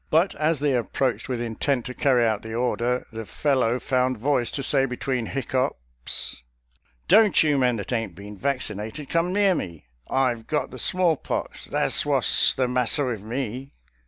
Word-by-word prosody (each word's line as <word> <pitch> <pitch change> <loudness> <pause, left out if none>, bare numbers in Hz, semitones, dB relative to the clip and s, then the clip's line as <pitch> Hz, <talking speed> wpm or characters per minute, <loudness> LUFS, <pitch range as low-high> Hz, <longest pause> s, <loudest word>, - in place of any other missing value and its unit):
But 165 +5 +3
as 155 +2 0
they 145 -2 +2
approached 125 +2 -1
with 125 -2 -2
intent 120 +2 -1
to 125 - -5
carry 125 -3 +2
out 110 -2 0
the 110 0 -7
order, 125 0 0
the 115 0 -5
fellow 125 0 0
found 130 -1 0
voice 125 0 0
to 140 - -4
say 135 0 +2
between 125 -2 -3
hiccoughs, 60 - -3 0.3
" 60 -1 -39
Don't 210 -4 +5
you 150 -3 +2
men 125 -2 +2
that 105 +2 -5
ain't 115 -7 -2
been 100 +2 -10
vaccinated 125 +1 -4
come 170 +2 +1
near 200 0 +3
me 85 - -5
— - - -44
I've 125 -4 0
got 150 - -1
the - - -8
smallpox 180 -5 0
— - - -19
tha's - - +2
wha's - - +4
the 130 -1 +2
masser 125 +3 +1
with 115 -5 -3
me." 125 +4 -5
125 Hz, 180 wpm, -24 LUFS, 115-140 Hz, 0.3 s, Don't